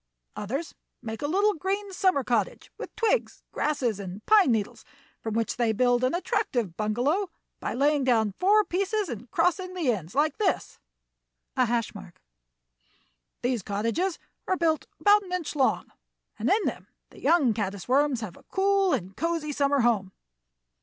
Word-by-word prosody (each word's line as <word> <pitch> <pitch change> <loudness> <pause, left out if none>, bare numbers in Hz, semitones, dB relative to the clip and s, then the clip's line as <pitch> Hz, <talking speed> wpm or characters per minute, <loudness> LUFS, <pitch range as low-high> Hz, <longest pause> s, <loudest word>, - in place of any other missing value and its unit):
Others 270 +11 -4 0.3
make 220 -1 -5
a 290 - -1
little 400 +6 +3
green 390 +3 -3
summer 370 -7 +2
cottage 235 -5 -1
with - - -9
twigs, 460 +1 0
grasses, 250 -8 -1
and 195 +1 -7
pine 415 - +6
needles, 215 -3 -2 0.4
from 220 -1 -3
which 230 0 -1
they 235 -2 +2
build 245 +2 +2
an 255 +5 +2
attractive 240 - -1
bungalow 250 - 0 0.3
by - - -3
laying 285 +2 +2
down 225 -5 +2
four 420 +3 +5
pieces 395 +2 -1
and 240 0 -7
crossing 360 +2 0
the 320 -9 +1
ends 185 -2 -5
like 300 +5 +1
this: 405 -4 -1 0.5
# - - -55 1.9
These 245 -2 0
cottages 230 - -1 0.3
are 375 - +1
built 320 -2 +1
about 415 0 +5
an 365 -2 -8
inch 355 -4 -3
long, 270 -3 +1 0.5
and - - 0
in 420 +1 +3
them - - -3 0.2
the - - -15
young 290 -9 +4
caddis 200 -3 -4
worms 270 -1 +2
have 205 -6 -6
a - - -17
cool 390 -1 +2
and 190 -6 -3
cosey 330 -2 -1
summer 280 -1 +2
home. 210 -6 +1
280 Hz, 155 wpm, -27 LUFS, 225-365 Hz, 1.9 s, pine